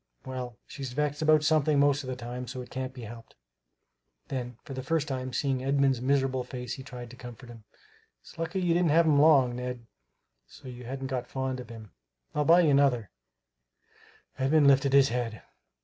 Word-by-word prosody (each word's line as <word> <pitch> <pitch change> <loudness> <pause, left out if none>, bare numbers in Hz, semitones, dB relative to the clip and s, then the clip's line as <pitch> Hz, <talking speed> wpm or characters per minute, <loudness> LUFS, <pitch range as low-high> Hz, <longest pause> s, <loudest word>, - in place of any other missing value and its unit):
Well, 125 -3 -6
she's 135 -4 -7
vexed 145 +1 -1
about 155 -1 +4
something 150 -1 +3
most 145 0 +3
of 130 - -7
the 130 - -3
time, 125 0 -6
so 130 - -6
it 125 - -15
can't 130 0 -4
be 130 -2 -10
helped!" 115 +1 -11 0.9
Then, 125 -3 -4
for 135 - -8
the 130 - -4
first 150 +3 -1
time 130 -1 -3
seeing 130 0 -1
Edmund's 135 -2 +2
miserable 130 -1 +1
face, 125 -1 -6
he - - -7
tried 125 -3 -9
to - - -11
comfort 120 0 -11
him. 115 -2 -14 0.5
"It's - - -16
lucky 165 +3 -2
you 175 -2 +2
didn't 175 -1 +2
have 165 +3 +5
him 145 -2 +4
long, 135 -6 +5
Ned, 125 -1 -5 0.6
so - - -14
you 125 -1 -9
hadn't 135 +2 -5
got 130 -2 -3
fond 130 0 -3
of 125 -3 -9
him. 110 -3 -11 0.4
And - - -2
I'll 150 - +2
buy 170 +3 +7
you 160 -4 +3
another" 135 -6 +2 1.3
Edmund 145 +3 +3
lifted 140 0 +4
his 140 -1 +6
head. 115 -2 -3
130 Hz, 195 wpm, -28 LUFS, 125-145 Hz, 1.3 s, buy